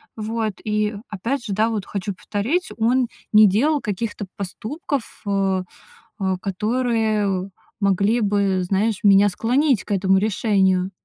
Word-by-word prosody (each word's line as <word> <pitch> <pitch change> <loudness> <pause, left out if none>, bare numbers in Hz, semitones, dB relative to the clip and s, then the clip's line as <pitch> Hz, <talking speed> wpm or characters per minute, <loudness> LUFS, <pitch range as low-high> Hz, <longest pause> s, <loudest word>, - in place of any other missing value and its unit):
Вот. 220 -1 -2
И 210 0 0
опять 235 +6 -3
же, 210 - -4
да, 215 +3 +2
вот 215 -4 -3
хочу 200 0 -4
повторить, 225 - -2
он 240 +2 +2 0.3
не 215 0 +8
делал 280 +10 +2
каких-то 210 0 -3
поступков, 240 - -4 0.2
э, 195 -2 +1 0.6
э, 190 -1 0
которые 210 -2 0 0.3
могли 200 +3 +2
бы, 200 -3 +1
знаешь, 200 +3 0
меня 200 0 +6
склонить 250 +5 +1
к - - -8
этому 190 0 +3
решению. 190 -2 +1
210 Hz, 130 wpm, -22 LUFS, 195-230 Hz, 0.6 s, не